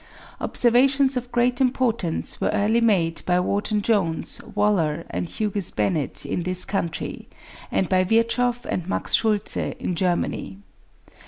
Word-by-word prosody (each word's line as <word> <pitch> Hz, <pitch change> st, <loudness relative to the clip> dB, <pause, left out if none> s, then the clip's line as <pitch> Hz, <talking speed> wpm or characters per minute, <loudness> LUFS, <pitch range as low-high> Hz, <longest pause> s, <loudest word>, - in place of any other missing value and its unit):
Observations 265 Hz, +3 st, +3 dB
of 250 Hz, 0 st, -4 dB
great 245 Hz, +1 st, +1 dB
importance 240 Hz, -9 st, 0 dB
were -, -, +1 dB
early 220 Hz, +3 st, +2 dB
made 175 Hz, -8 st, +2 dB
by 180 Hz, 0 st, +3 dB
Wharton 205 Hz, +3 st, 0 dB
Jones, 190 Hz, -8 st, 0 dB
Waller, 170 Hz, -6 st, +1 dB
and 175 Hz, -, -3 dB
Hughes 205 Hz, -2 st, -2 dB
Bennett 155 Hz, -7 st, -1 dB
in 140 Hz, +5 st, -2 dB
this 185 Hz, +1 st, -1 dB
country, 170 Hz, -5 st, -4 dB, 0.4 s
and 190 Hz, -, +1 dB
by 185 Hz, -1 st, +3 dB
Virchow 230 Hz, +4 st, +2 dB
and 180 Hz, 0 st, -3 dB
Max -, -, -1 dB
Schultze 215 Hz, -2 st, +2 dB, 0.2 s
in -, -, -3 dB
Germany. 175 Hz, -, -1 dB
205 Hz, 135 wpm, -23 LUFS, 175-235 Hz, 0.4 s, Observations